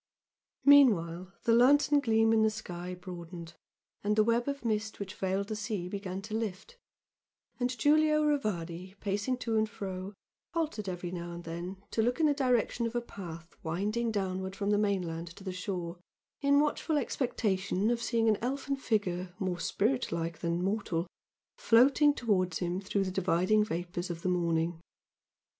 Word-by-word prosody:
Meanwhile 190 -11 +5
the 230 - +3
lantern 285 +5 +5
gleam 225 -3 +3
in 220 - +4
the 220 - +4
sky 180 -4 -6
broadened 175 -2 -8 0.5
and 210 +1 +1
the 215 - +5
web 235 +3 +1
of 280 -3 -3
mist 215 -1 -1
which 200 -1 -5
veiled 195 +1 -1
the 215 - -2
sea 210 -4 -3
began 195 0 -5
to 215 +1 -7
lift 225 - -4 0.8
and 250 0 -1
Giulio 305 +1 +4
Rivardi, 190 - -1
pacing 205 +5 -1
to 230 -2 -2
and 215 0 +2
fro, 190 -1 -6 0.4
halted 305 - -1
every 180 -1 -4
now 175 -1 -5
and 170 0 -8
then 175 +4 -6
to 225 - +1
look 245 +5 +1
in 320 - +4
the 295 - +4
direction 250 -3 +1
of 230 - -7
a - - +3
path 170 -7 -9
winding 210 +8 -1
downward 190 -2 -2
from 200 0 -1
the 205 - +3
mainland 180 -5 -1
to 195 - -12
the 190 -1 -4
shore, 180 -2 -4 0.4
in 280 0 +4
watchful 300 +1 +1
expectation 210 -6 0
of 235 -1 -1
seeing 230 -1 +1
an 215 -2 +3
elfin 275 +3 -2
figure, 185 -7 -1
more 185 -2 -2
spiritlike 170 -8 -1
than 170 +1 -1
mortal, 190 -4 -1 0.5
floating 275 +6 +5
towards 185 - +1
him 180 +1 -2
through 200 0 0
the 185 - -3
dividing 190 +3 +2
vapours 175 -1 -4
of 170 -1 -5
the 185 - +1
morning. 170 -1 0
200 Hz, 165 wpm, -31 LUFS, 180-235 Hz, 0.8 s, Meanwhile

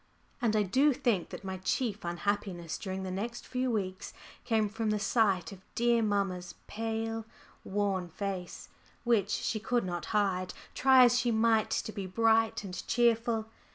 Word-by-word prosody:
And 225 -3 +2
I 210 - +3
do 270 +9 +3
think 240 -9 0
that - - -8
my 190 -1 -4
chief 210 +3 -1
unhappiness 175 -1 -2
during 190 -1 -4
the 185 - -4
next 225 +6 -4
few 255 0 -1
weeks 190 -5 -3 0.3
came 220 -3 +2
from 220 +1 -2
the 210 - +1
sight 200 -5 +1
of 190 -2 -11
dear 235 0 +3
mamma's 195 -4 -1
pale, 225 +1 -3 0.4
worn 195 -3 -1
face, 190 0 -5 0.3
which 225 -5 +2
she 215 - -1
could 240 0 0
not 175 -1 -3
hide, 190 -3 0 0.2
try 260 -1 +6
as 245 0 +5
she 245 - +1
might 225 -1 +3
to - - -1
be 200 -3 -5
bright 225 +2 +2
and 185 -2 -6
cheerful. 230 -2 +2
210 Hz, 160 wpm, -31 LUFS, 190-230 Hz, 0.4 s, try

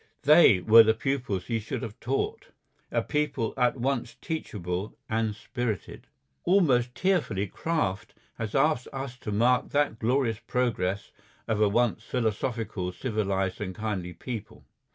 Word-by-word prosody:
They 145 - +7
were 115 +3 +9
the 110 0 +4
pupils 125 -7 -2
he 115 -2 -1
should 115 +4 -5
have 110 -3 -7
taught. 135 +3 -2 0.4
A - - +1
people 140 -6 -1
at 125 +1 +2
once 130 0 -1
teachable 100 - -4
and 110 -1 0
spirited. 115 -2 -4 0.4
Almost 130 -10 +3
tearfully 130 - +1
Kraft 105 - -2 0.2
has 110 -2 -3
asked 135 -2 +2
us 135 -2 -5
to 105 - -6
mark 125 +4 +2
that 145 -6 +1
glorious 115 -1 +1
progress 105 -6 -1 0.4
of 110 -2 0
a 105 - +5
once 115 +1 +1
philosophical, 110 -5 -2
civilised, 95 -3 -2
and 95 -3 -4
kindly 100 -5 -3
people. 110 +6 -7
115 Hz, 135 wpm, -27 LUFS, 105-130 Hz, 0.4 s, were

